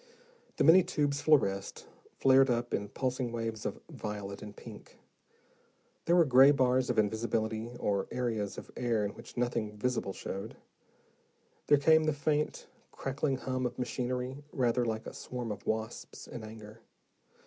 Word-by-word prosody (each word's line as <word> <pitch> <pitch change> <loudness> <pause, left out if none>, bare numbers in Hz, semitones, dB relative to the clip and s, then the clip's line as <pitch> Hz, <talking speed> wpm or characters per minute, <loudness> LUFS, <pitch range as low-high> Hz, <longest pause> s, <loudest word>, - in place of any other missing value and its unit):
The - - +3
many 175 +4 +8
tubes 145 -6 -1
fluoresced, 100 -11 +2 0.3
flared 135 0 +5
up 120 0 0
in 100 0 -1
pulsing 130 0 -2
waves 115 -2 -3
of 105 - -5
violet 105 -9 -6
and 105 -1 -9
pink: - - -12 1.1
there 170 - +4
were 170 -2 +6
gray 135 0 +7
bars 130 -2 +3
of 125 - 0
invisibility 110 +1 0
or 100 -1 0
areas 115 -5 -2
of - - -9
air 115 -4 0
in 100 - -2
which - - -13
nothing 115 -3 -1
visible 125 -3 -1
showed. 95 0 -6 1.1
There 145 - +6
came 160 +2 +5
the 155 - +2
faint, 150 +1 -1 0.3
crackling 135 0 -2
hum 130 -1 -1
of - - -9
machinery 125 +2 -3
rather 125 -2 +1
like 110 -1 -2
a - - -7
swarm 125 -3 -5
of 100 - -7
wasps 110 0 -4
in 115 - -8
anger. 110 0 -11
120 Hz, 150 wpm, -31 LUFS, 110-135 Hz, 1.1 s, many